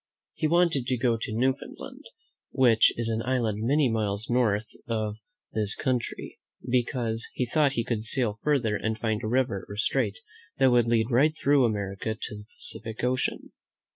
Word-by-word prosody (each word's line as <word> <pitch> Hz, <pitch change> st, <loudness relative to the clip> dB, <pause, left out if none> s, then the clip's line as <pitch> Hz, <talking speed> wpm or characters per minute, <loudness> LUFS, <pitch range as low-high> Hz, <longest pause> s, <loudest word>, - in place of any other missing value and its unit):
He 155 Hz, -, 0 dB
wanted 165 Hz, -6 st, +2 dB
to 130 Hz, -, +1 dB
go 120 Hz, 0 st, +2 dB
to -, -, -3 dB
Newfoundland, 130 Hz, +3 st, -3 dB, 0.4 s
which 120 Hz, -4 st, +5 dB
is 115 Hz, -1 st, 0 dB
an 115 Hz, 0 st, -1 dB
island 115 Hz, -4 st, 0 dB
many 140 Hz, +5 st, +3 dB
miles 110 Hz, -1 st, -2 dB
north 110 Hz, -3 st, +2 dB, 0.2 s
of 110 Hz, -2 st, -2 dB, 0.4 s
this 105 Hz, -2 st, 0 dB
country, 125 Hz, -3 st, -3 dB, 0.3 s
because 120 Hz, -2 st, 0 dB
he 125 Hz, -, 0 dB
thought 145 Hz, +2 st, +2 dB
he 115 Hz, -, 0 dB
could 115 Hz, -2 st, -2 dB
sail 115 Hz, -3 st, -1 dB
further 130 Hz, -8 st, +1 dB
and 110 Hz, +1 st, -2 dB
find 110 Hz, -2 st, -1 dB
a -, -, -3 dB
river 120 Hz, -4 st, 0 dB
or 100 Hz, -, -6 dB
strait 110 Hz, -1 st, 0 dB, 0.4 s
that 135 Hz, -1 st, +5 dB
would 120 Hz, -1 st, +4 dB
lead 115 Hz, +1 st, +2 dB
right 150 Hz, +6 st, +3 dB
through 140 Hz, -2 st, +4 dB
America 105 Hz, 0 st, -2 dB
to -, -, -4 dB
the 105 Hz, 0 st, -10 dB
Pacific 110 Hz, 0 st, -3 dB
Ocean. 130 Hz, +1 st, -1 dB
115 Hz, 170 wpm, -27 LUFS, 110-130 Hz, 0.4 s, which